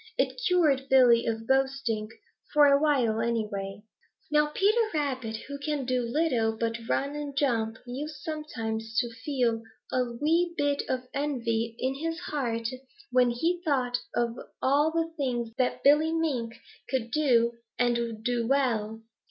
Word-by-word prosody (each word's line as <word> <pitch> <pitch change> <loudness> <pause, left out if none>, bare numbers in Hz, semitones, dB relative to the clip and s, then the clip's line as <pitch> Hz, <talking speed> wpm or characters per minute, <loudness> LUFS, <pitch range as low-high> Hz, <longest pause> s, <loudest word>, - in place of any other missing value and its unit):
It - - 0
cured 300 -7 +3
Billy 245 -3 +6
of 225 0 -2
boasting, 265 -4 0 0.4
for 295 -1 +6
a 280 0 +5
while, 255 -8 +2
anyway. 210 -3 -2 0.5
Now 300 0 +4
Peter 405 +9 +2
Rabbit, 260 -7 -2
who 280 0 -6
can 290 -2 -2
do 255 0 +1
little 235 -4 0
but 230 0 -1
run 280 +2 0
and 290 -2 -5
jump, 225 -5 +1
used 285 +5 -5
sometimes 225 -8 -4
to 240 -2 +1
feel 230 -1 -1 0.3
a 255 - +2
wee 330 +7 +1
bit 285 -1 +1
of 255 -1 -1
envy 235 -6 -1
in 260 +1 -1
his 325 +4 -3
heart 230 -6 -2 0.4
when 250 -1 +4
he 330 +9 0
thought 255 -6 +1 0.2
of 235 0 0 0.2
all 285 +4 +3
the 330 0 -1
things 240 -5 -2
that 255 - 0
Billy 295 +3 +5
Mink 270 -9 -1 0.3
could 245 -3 -1
do 235 -5 +2 0.2
and 235 -2 0
do 240 -1 0
well. 225 -5 0
255 Hz, 145 wpm, -28 LUFS, 230-295 Hz, 0.5 s, Billy